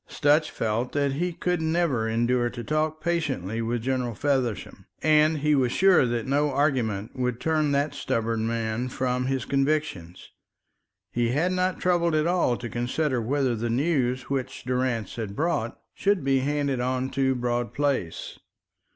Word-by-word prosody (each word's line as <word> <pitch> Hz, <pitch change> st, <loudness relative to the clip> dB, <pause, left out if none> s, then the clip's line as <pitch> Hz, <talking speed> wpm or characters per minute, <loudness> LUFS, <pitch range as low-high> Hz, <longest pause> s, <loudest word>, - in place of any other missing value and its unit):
Sutch 150 Hz, +1 st, +2 dB
felt 115 Hz, +3 st, -2 dB
that 140 Hz, -1 st, +1 dB
he 175 Hz, +6 st, -1 dB
could 180 Hz, 0 st, -1 dB
never 160 Hz, -8 st, +1 dB
endure 120 Hz, +2 st, +1 dB
to 120 Hz, 0 st, -7 dB
talk 155 Hz, +4 st, -1 dB
patiently 135 Hz, -, -1 dB
with 115 Hz, 0 st, -2 dB
General 125 Hz, -3 st, -1 dB
Feversham, 130 Hz, -5 st, -2 dB, 0.2 s
and 155 Hz, 0 st, +4 dB
he 150 Hz, +1 st, +2 dB
was 130 Hz, -4 st, +2 dB
sure 185 Hz, -7 st, +5 dB
that 120 Hz, -1 st, -2 dB
no 145 Hz, +2 st, +1 dB
argument 125 Hz, -8 st, 0 dB
would 125 Hz, -2 st, -1 dB
turn 155 Hz, -2 st, +1 dB
that 140 Hz, +2 st, +1 dB
stubborn 115 Hz, 0 st, -1 dB
man 115 Hz, +1 st, -2 dB
from 125 Hz, 0 st, -1 dB
his 135 Hz, -3 st, -1 dB
convictions. 135 Hz, -, -1 dB, 0.8 s
He 120 Hz, -1 st, 0 dB
had 155 Hz, +9 st, +1 dB
not 185 Hz, 0 st, 0 dB
troubled 170 Hz, -2 st, +2 dB
at 155 Hz, 0 st, +2 dB
all 170 Hz, -8 st, +2 dB
to 120 Hz, -, -6 dB
consider 125 Hz, +3 st, -1 dB
whether 130 Hz, +1 st, 0 dB
the 115 Hz, +1 st, -2 dB
news 130 Hz, -1 st, +1 dB
which 135 Hz, 0 st, -4 dB
Durrance 125 Hz, -5 st, -1 dB
had 105 Hz, -3 st, -4 dB
brought 145 Hz, -7 st, -1 dB
should 200 Hz, -4 st, +1 dB
be 135 Hz, 0 st, +2 dB
handed 140 Hz, -1 st, 0 dB
on 130 Hz, +1 st, -1 dB
to 130 Hz, 0 st, +1 dB
Broad 120 Hz, -1 st, -1 dB
Place. 140 Hz, -, -2 dB
130 Hz, 160 wpm, -26 LUFS, 120-150 Hz, 0.8 s, sure